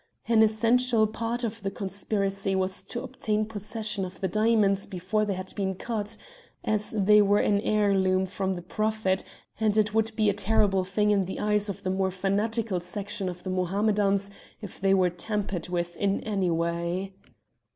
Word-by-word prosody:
An 230 -2 +5
essential 230 +1 +3
part 230 +3 -3
of 225 -1 -3
the 195 - -1
conspiracy 195 0 -2
was 190 0 0
to 240 +4 -5
obtain 215 0 -1
possession 210 -1 -3
of 185 0 -7
the 190 - 0
diamonds 210 0 +2
before 200 +3 -1
they 200 -2 -1
had 185 0 -7
been 190 -2 -2
cut, 210 0 -4 0.5
as 215 -1 0
they 210 0 +5
were 205 0 +4
an 205 -1 +2
heirloom 195 -3 +2
from 190 0 -2
the 175 -1 -6
Prophet, 215 -2 0 0.4
and 215 -1 +2
it 210 -1 +2
would 220 0 +2
be 215 -1 +2
a 205 - +4
terrible 200 -1 +2
thing 210 +3 +1
in 200 -2 +2
the 190 - -5
eyes 210 0 +1
of 195 - -6
the 185 - 0
more 190 0 +1
fanatical 200 +2 -1
section 200 +2 -4
of 180 0 -8
the 185 - -3
Mohammedans 200 +2 +1 0.3
if 205 -4 -10
they 195 0 +4
were 185 -2 +3
tampered 195 -1 -3
with 175 -1 -2
in 200 -1 +1
any 195 -4 0
way. 170 +3 -1
200 Hz, 175 wpm, -27 LUFS, 190-215 Hz, 0.5 s, An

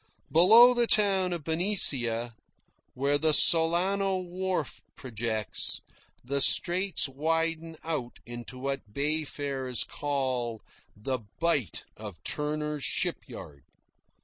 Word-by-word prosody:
Below 225 +9 +7
the 240 -1 +1
town 195 -4 +2
of 170 -3 -5
Benicia, 135 - +2 0.6
where 140 +2 0
the 155 0 +3
Solano 185 +5 +2
wharf 185 +1 -4
projects, 110 -4 -3 0.4
the 140 +2 -1
Straits 180 +3 +5
widen 165 +3 -3
out 150 -7 -4
into 120 +2 -9
what 135 -5 -6
bay 150 +2 0
farers 135 -3 -3
call 130 -5 -3 0.3
the 130 +5 -3 0.2
"Bight 165 - -1
of 105 -4 -9
Turner's 150 -1 -3
Shipyard." 70 - -5
150 Hz, 100 wpm, -27 LUFS, 125-175 Hz, 0.6 s, Below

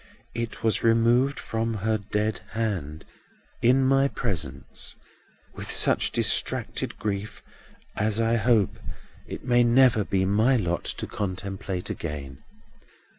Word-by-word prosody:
It 115 -1 -5
was 110 -1 +1
removed 115 +4 +3
from 115 0 -2
her 110 +1 -1
dead 105 +2 -2
hand, 95 -9 -3 0.6
in 130 +3 +4
my 135 +1 +4
presence, 80 - -5 0.6
with - - -8
such - - +5
distracted - - +1
grief 105 -1 -4 0.5
as 105 +1 0
I 115 0 +2
hope 110 -3 +2 0.5
it - - -8
may 120 -1 +4
never 120 -2 +4
be 95 -1 0
my 110 +7 +3
lot 85 -5 -2
to - - -3
contemplate 95 -1 -4
again. 70 -4 -6
110 Hz, 120 wpm, -25 LUFS, 95-115 Hz, 0.6 s, such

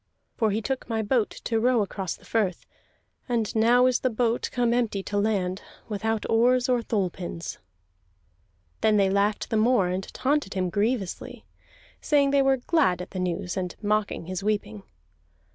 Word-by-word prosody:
"For 220 - +1
he 215 +2 -1
took 265 +1 -3
my 220 -1 0
boat 220 0 +1
to 225 -1 -2
row 240 -1 +3
across 190 -2 -4
the - - -20
firth, 205 -6 -1 0.6
and 230 -4 -1
now 240 +3 +5
is 255 -1 +3
the 255 - +1
boat 235 0 0
come 240 -1 +1
empty 225 -5 0
to 205 - -3
land, 195 -3 0 0.3
without 220 +1 -2
oars 245 +3 +3
or 250 -2 +2
thole 200 -5 -1
pins." 170 -1 -6 1.2
Then 215 -1 +4
they 195 -1 +3
laughed 200 +1 0
the 220 - +2
more, 215 -4 +3
and 185 +1 -4
taunted 275 -7 -1
him 185 -2 -1
grievously, 205 -1 -2 0.6
saying 285 -2 +3
they 280 0 +4
were 270 0 +3
glad 255 - +1
at 180 - -7
the 185 - -5
news, 180 0 -2
and 180 -2 -3
mocking 210 -4 -1
his 185 +1 -4
weeping. 195 - -2
215 Hz, 170 wpm, -26 LUFS, 195-245 Hz, 1.2 s, now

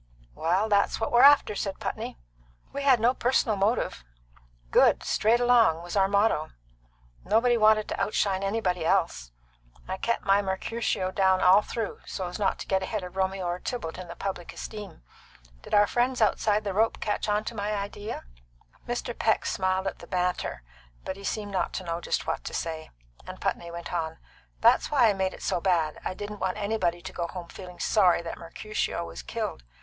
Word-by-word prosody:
"Well, 180 - +1
that's 200 -2 +2
what 225 - -1
we're 240 - +5
after," 285 -6 +7
said 195 -1 -3
Putney. - - -4 0.6
"We 280 - -3
had 270 -4 +5
no 235 +3 +3
personal 245 -4 +1
motive; 200 - 0 0.7
good, - - +6
right - - -10
straight 225 +3 +2
along, 235 -10 +4
was 175 +2 -6
our 195 -1 +4
motto. 200 -6 +2 0.7
Nobody 230 +4 +3
wanted 215 -1 +4
to - - -3
outshine 195 -2 +1
anybody 195 -4 -1
else. - - 0 0.6
I 190 +1 -3
kept 235 +4 -1
my 195 +1 +4
Mercutio 190 0 -2
down 190 -1 +3
all 185 +3 +7
through, 220 0 -4
so's 180 0 -5
not 200 - +1
to - - -7
get 190 -1 +1
ahead 200 +1 -3
of 180 0 -8
Romeo 190 -1 -1
or 175 +1 -2
Tybalt 185 -9 -5
in 180 - -7
the 170 - -8
public 190 -3 -5
esteem. 210 - -8 0.6
Did - - -2
our 205 0 +6
friends 245 +4 0
outside 215 -1 +2
the 200 -2 -2
rope 220 +3 +1
catch 210 0 -2
on 210 +1 +1
to 235 - -5
my 205 -1 -2
idea?" 205 +1 -5 0.6
Mr. - - -3
Peck - - +1
smiled 185 0 0
at 195 - -3
the - - -11
banter, 180 - -2 0.4
but 190 - -3
he 200 - -12
seemed 205 0 -3
not 190 - -1
to - - -4
know 170 -1 -3
just - - -1
what - - -2
to - - -5
say, 160 -1 -4 0.4
and - - -8
Putney 170 - -2
went 170 +1 -7
on: 160 -2 -2 0.4
"That's - - +5
why 260 -6 +5
I - - +2
made 190 -1 -1
it - - -12
so 175 - 0
bad. 170 -5 +1
I - - -3
didn't 205 +1 -7
want 185 0 -1
anybody 200 -5 -1
to 190 0 -7
go 170 -1 -2
home 175 -1 -8
feeling 180 -2 -10
sorry 185 -5 +3
that 165 - -6
Mercutio 170 - -3
was 80 -7 -8
killed. - - -4
195 Hz, 195 wpm, -27 LUFS, 180-215 Hz, 0.7 s, after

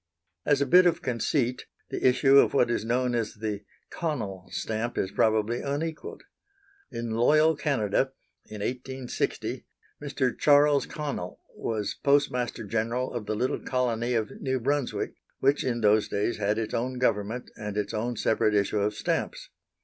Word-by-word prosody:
As 145 -1 +3
a - - +3
bit 180 +6 +6
of 170 - 0
conceit, 125 +1 -1 0.2
the - - +1
issue 135 +2 +6
of - - +3
what 120 -3 +3
is 120 - 0
known 125 +2 0
as 115 -3 -1
the 105 -1 -4 0.3
Connell 110 - -4
stamp 115 +2 -3
is 95 - -1
probably 110 +3 +1
unequalled. 155 +3 -4 0.7
In 115 -1 -4
loyal 155 +8 +4
Canada, 135 -4 0 0.4
in 105 -1 -8
1860, 130 +2 -3 0.3
Mr. 135 -3 -1
Charles 145 -1 +4
Connell 140 -12 -5 0.2
was 105 -3 -2
Postmaster 125 -5 +1
General 115 +4 -1
of 115 -4 -5
the 110 - -1
little 125 +5 0
colony 120 -1 -1
of 110 -2 -1
New 130 -1 0
Brunswick, 140 +1 -1 0.3
which 140 +2 +2
in 120 -2 -1
those 105 0 +4
days 105 +4 -1
had 105 +2 0
its 110 -1 -3
own 125 +2 -1
government 115 -1 -1
and 105 -1 -5
its 105 -1 -2
own 120 +3 -2
separate 110 -1 +1
issue 100 +1 +1
of 105 +1 0
stamps. - - -2
120 Hz, 155 wpm, -27 LUFS, 110-135 Hz, 0.7 s, bit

